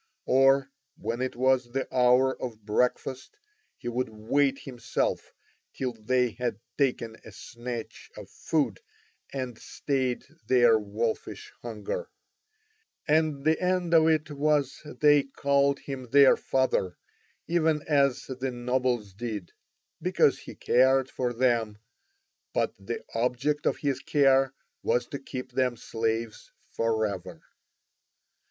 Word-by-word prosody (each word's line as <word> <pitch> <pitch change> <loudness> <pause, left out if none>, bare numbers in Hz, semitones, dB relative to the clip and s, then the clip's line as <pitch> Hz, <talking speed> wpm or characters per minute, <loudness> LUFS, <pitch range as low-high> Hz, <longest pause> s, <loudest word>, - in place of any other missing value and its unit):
Or 135 +1 +4 0.3
when 120 +2 -3
it 130 - -2
was 125 -1 +1
the 135 0 -1
hour 125 +1 +4
of 110 -4 -6
breakfast 125 - -1 0.4
he - - -9
would 120 0 -1
wait 135 +6 +1
himself 120 -5 -3 0.4
till 130 -2 -2
they 125 +2 +1
had 120 -2 -3 0.2
taken 120 -5 0
a 110 - -11
snatch 120 +2 -7
of - - -9
food 140 - -1 0.5
and 130 -4 -5
stayed 130 -3 -2 0.2
their 120 -3 +5
wolfish 110 +2 -4
hunger; 110 -4 -5 1.0
and 155 -2 +2
the 160 +2 +2
end 180 -2 0
of 160 -1 +6
it 155 -1 +1
was 145 -2 0 0.2
they 145 -1 +6
called 140 0 +1
him 130 -3 -7
their 140 +2 +7
father 130 -9 0 0.5
even 160 -3 +1
as 140 -4 +2
the 130 0 -4
nobles 125 -4 -1
did, 105 -3 -5 0.5
because - - +3
he - - -10
cared 130 +1 +3
for 125 -1 -1
them, 115 -3 +1 0.8
but - - +1
the 450 - -5
object 125 +6 0
of - - +1
his 140 -3 -1
care 135 -2 +3 0.3
was 120 0 +1
to 140 -3 -5
keep 130 -1 -7
them 125 -1 0
slaves 115 -1 -3 0.2
for 115 -1 +1
ever. 100 -4 -6
130 Hz, 125 wpm, -27 LUFS, 115-140 Hz, 1.0 s, their